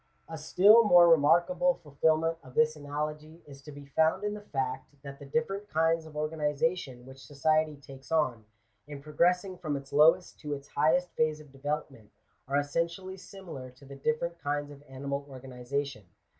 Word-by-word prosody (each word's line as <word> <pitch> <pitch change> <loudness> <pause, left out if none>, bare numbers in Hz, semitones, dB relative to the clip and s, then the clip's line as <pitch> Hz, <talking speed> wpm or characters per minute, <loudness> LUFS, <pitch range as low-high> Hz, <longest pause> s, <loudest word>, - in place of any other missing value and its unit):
A 160 - -7
still 195 +9 +6
more 175 -5 +7
remarkable 175 - +4
fulfilment 160 +1 0
of 130 -1 -15
this 155 0 +3
analogy 150 +2 -6
is 140 -1 -13
to 150 - -11
be 145 0 -11
found 160 +6 +1
in 210 0 -1
the 210 - -7
fact, 135 -6 -4
that 140 -1 -9
the 140 - -11
different 205 +4 -2
kinds 165 0 +1
of 150 -1 -11
organization 150 -3 -2
which 130 0 -13
society 155 +3 +1
takes 135 0 -14
on, 130 -9 0 0.4
in 145 -1 -8
progressing 180 +5 0
from 150 -3 -2
its 135 0 -11
lowest 165 +5 +4
to 150 -1 -4
its 140 0 -12
highest 165 +5 +1
phase 155 -1 0
of 150 -3 -15
development, 135 -5 -5 0.4
are 140 +1 0
essentially 170 +6 -2
similar 180 -9 -10
to 130 +2 -18
the 140 0 -10
different 170 0 -2
kinds 145 0 -3
of 140 -1 -13
animal 140 +1 -4
organization. 130 -1 -5
150 Hz, 170 wpm, -29 LUFS, 140-165 Hz, 0.4 s, more